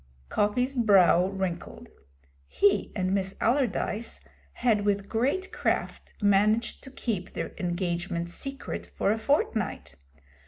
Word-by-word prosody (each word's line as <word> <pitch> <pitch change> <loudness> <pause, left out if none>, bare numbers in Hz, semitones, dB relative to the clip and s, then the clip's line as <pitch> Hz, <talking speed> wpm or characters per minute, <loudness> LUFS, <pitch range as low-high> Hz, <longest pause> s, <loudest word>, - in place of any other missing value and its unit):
Coppy's 245 +6 +1
brow 195 -7 +5
wrinkled. 190 -3 -4 0.6
He 200 - +2
and 185 -2 0
Miss 190 -1 0
Allardyce 235 -2 0 0.3
had 225 -4 +1
with 200 -1 0
great 275 - 0
craft - - -2
managed 210 +3 +2
to - - -9
keep 220 -8 -4
their - - -4
engagement 175 -1 -2
secret 275 +10 -5
for 200 - 0
a 220 - +1
fortnight. 220 - -1
205 Hz, 115 wpm, -27 LUFS, 185-235 Hz, 0.6 s, brow